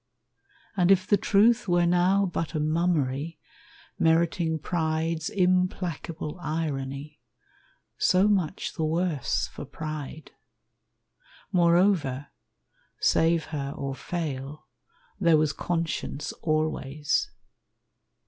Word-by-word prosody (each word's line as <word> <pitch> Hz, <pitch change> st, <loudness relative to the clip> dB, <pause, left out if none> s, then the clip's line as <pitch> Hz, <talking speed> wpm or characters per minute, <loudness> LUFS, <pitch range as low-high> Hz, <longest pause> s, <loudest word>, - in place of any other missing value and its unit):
And 180 Hz, -2 st, +3 dB
if 190 Hz, -1 st, +5 dB
the 205 Hz, -, +4 dB
truth 210 Hz, +3 st, +3 dB
were 175 Hz, -1 st, +3 dB
now 180 Hz, +3 st, +3 dB
but 165 Hz, -2 st, -3 dB
a -, -, +1 dB
mummery, 155 Hz, -2 st, 0 dB, 0.6 s
Meriting 165 Hz, 0 st, +2 dB
pride's 160 Hz, 0 st, -1 dB
implacable 180 Hz, -4 st, -1 dB
irony, 150 Hz, -2 st, -4 dB, 0.8 s
So 185 Hz, +2 st, +4 dB
much 190 Hz, -5 st, 0 dB
the 160 Hz, -, -3 dB
worse 160 Hz, -3 st, 0 dB
for -, -, -7 dB
pride. 155 Hz, -1 st, -7 dB, 1.2 s
Moreover, 170 Hz, -6 st, +2 dB, 0.7 s
Save 165 Hz, 0 st, +3 dB
her 140 Hz, -1 st, -3 dB
or 140 Hz, -1 st, -3 dB
fail, 145 Hz, -1 st, -5 dB, 0.5 s
there 170 Hz, -5 st, +5 dB
was 155 Hz, -1 st, +1 dB
conscience 165 Hz, -4 st, -3 dB
always. 155 Hz, -2 st, 0 dB
160 Hz, 90 wpm, -27 LUFS, 150-180 Hz, 1.2 s, if